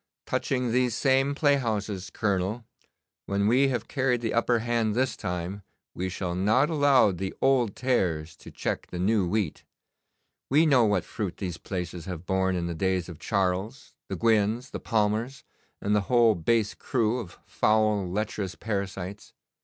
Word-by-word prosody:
Touching 125 -3 -1
these 125 -1 +1
same 135 +1 +2
playhouses, 110 - 0
Colonel, 100 +3 -1 0.6
when 100 0 0
we 130 +5 +4
have 120 -4 -2
carried 130 -3 0
the 115 - -2
upper 120 +1 +2
hand 115 -2 0
this 130 +1 +1
time, 90 +1 -4 0.3
we 95 +1 -3
shall 90 -1 -3
not 110 - +2
allow 145 -8 +4
the 95 +1 -4
old 125 -6 +2
tares 85 -11 0
to - - -12
check - - -3
the 90 - -7
new 95 +1 +2
wheat. 100 -3 -1 0.9
We 150 +5 +5
know 130 -6 +5
what 100 -3 +1
fruit 100 -5 -4
these 90 -4 -4
places 90 -2 -5
have 90 -2 -6
borne 95 0 +1
in 85 -1 -1
the 85 - -3
days 95 +1 -1
of 85 -3 -9
Charles, 100 +6 -2
the - - -4
Gwynnes, 115 +2 +1
the - - -5
Palmers, 110 +4 -1 0.4
and 105 +1 +1
the 105 - +3
whole 120 -3 +5
base 105 +4 +1
crew 120 -1 0
of 100 -8 -9
foul 105 -3 +2
lecherous 100 -1 -3
parasites. 100 -2 -5
105 Hz, 160 wpm, -27 LUFS, 95-120 Hz, 0.9 s, We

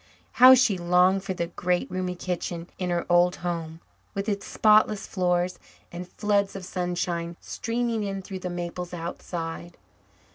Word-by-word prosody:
How 260 +1 +11
she 235 -7 +2
longed 180 +2 +3
for 190 -2 -3
the 170 - -1
great, 180 +1 -1
roomy 185 0 -2
kitchen 175 -1 -4
in 180 -1 -2
her 175 -1 -1
old 175 +1 +4
home, 165 -1 -4 0.3
with 200 +1 -3
its 200 -2 -2
spotless 215 -1 +4
floors 180 -1 0 0.3
and 175 +1 -7
floods 200 0 0
of 190 -2 -6
sunshine 175 -2 -3
streaming 230 -1 -2
in 195 -2 -3
through 190 0 -6
the 180 - -4
maples 175 0 -5
outside. 170 0 -6
180 Hz, 150 wpm, -26 LUFS, 175-195 Hz, 0.3 s, How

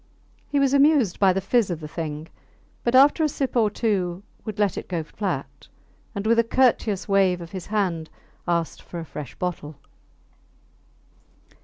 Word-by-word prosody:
He 285 - +1
was 275 -1 +3
amused 280 - +4
by 195 -2 +5
the 195 +1 -1
fizz 220 +2 +2
of 170 -3 -3
the 155 - -7
thing, 155 -1 -5 0.6
but 240 +1 +1
after 285 +5 +6
a 305 - +3
sip 270 -2 -3
or 225 -3 +4
two 195 -4 -1 0.2
would 215 -2 -6
let 205 -3 +1
it - - -6
get 170 -4 -2
flat, 200 +4 -5 0.5
and 200 +1 -3
with 230 +1 +4
a - - +5
courteous 230 -5 +2
wave 195 -3 +3
of 170 -1 -9
his 185 -3 -7
hand 185 -7 -1 0.4
ask 170 -1 -1
for 175 - -8
a 165 - -6
fresh 140 -2 -8
bottle. 160 -4 -4
195 Hz, 170 wpm, -24 LUFS, 170-230 Hz, 0.6 s, after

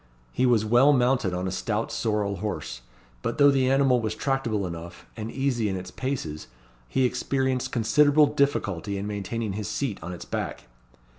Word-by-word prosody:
He 130 - +1
was 115 -3 +3
well 120 +6 +5
mounted 125 -6 +2
on 90 +1 -2
a - - -2
stout 105 +4 -2
sorrel 105 -3 -1
horse; 85 - -4 0.4
but - - -3
though 145 0 +7
the 130 -2 +2
animal 135 -2 +3
was 110 -1 -2
tractable 120 -8 -1
enough, 85 0 -8
and 110 -1 -5
easy 130 -5 0
in 95 - -2
its 90 0 -6
paces, 100 - -4 0.4
he 130 - +1
experienced 130 0 -1
considerable 145 +6 +4
difficulty 105 - 0
in 100 - -4
maintaining 105 +1 -3
his 105 0 -4
seat 130 -8 -2
on 90 +3 -6
its 90 - -8
back. - - -4
115 Hz, 170 wpm, -26 LUFS, 100-135 Hz, 0.4 s, though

